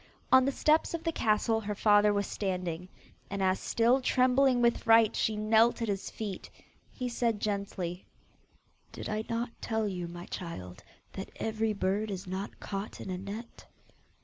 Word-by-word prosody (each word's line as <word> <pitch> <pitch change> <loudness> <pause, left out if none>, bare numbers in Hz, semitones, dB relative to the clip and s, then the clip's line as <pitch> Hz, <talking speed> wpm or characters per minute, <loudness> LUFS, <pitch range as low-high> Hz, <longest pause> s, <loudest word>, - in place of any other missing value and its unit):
On 260 0 +7
the 275 - +2
steps 310 +4 +2
of 330 - -6
the 330 - 0
castle 220 -3 +1
her 210 -1 -3
father 205 0 +5
was 200 0 0
standing, 180 -3 -3 0.4
and 200 -1 -2
as 190 0 +2
still 240 +3 +2
trembling 255 0 +3
with 235 -1 +3
fright 225 -2 +5
she 220 - +1
knelt 220 +3 +3
at 230 - -1
his 200 -2 -2
feet, 205 -4 -6 0.4
he 250 - -4
said 235 -3 0
gently, 195 -4 -3 0.8
'Did - - -7
I 215 +1 -2
not 230 +1 -2
tell 220 -2 -1
you, 180 -3 -4
my 175 +1 -8
child, 90 - -7 0.3
that 190 - -6
every 220 0 -1
bird 200 +2 -1
is 195 -1 -5
not 190 +2 -5
caught 195 +1 -5
in 190 - -6
a 180 - -2
net? 210 +5 -8
210 Hz, 170 wpm, -30 LUFS, 190-230 Hz, 0.8 s, On